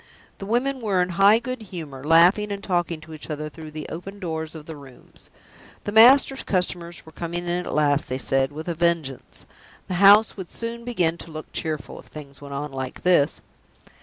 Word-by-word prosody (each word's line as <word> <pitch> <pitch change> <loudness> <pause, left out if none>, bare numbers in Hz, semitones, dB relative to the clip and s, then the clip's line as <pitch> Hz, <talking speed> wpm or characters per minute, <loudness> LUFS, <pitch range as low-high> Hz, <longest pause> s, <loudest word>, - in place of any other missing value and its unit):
The 195 - -7
women 255 +4 0
were 200 -4 +1
in 180 - -4
high 195 +5 +5
good 255 +1 -5
humor, 160 -10 -8
laughing 175 +7 +5
and 200 0 -5
talking 175 -4 -1
to 160 0 -12
each 155 0 -9
other 150 0 -4
through 155 0 -10
the 155 0 -7
open 195 +5 -7
doors 160 -4 -5
of 155 -2 -9
the 160 - -8
rooms. 135 -3 -15 0.5
The 205 - -4
master's 260 +5 +6
customers 175 -3 -2
were 160 - -13
coming 170 +2 -5
in - - -1 0.2
at - - -4
last, 150 -1 +1
they 130 - -1
said, 135 +3 0
with 155 +3 -8
a 170 - -1
vengeance; 165 -5 -2 0.4
the - - -3
house 205 +2 +7
would 190 -4 -8
soon 235 0 -6
begin 175 -9 0
to - - -10
look 155 0 -8
cheerful, 155 -3 -4
if - - -15
things 140 -2 -11
went 140 -1 -7
on 145 +1 -4
like 130 -1 -6
this. 175 -6 +3
170 Hz, 200 wpm, -24 LUFS, 150-200 Hz, 0.5 s, house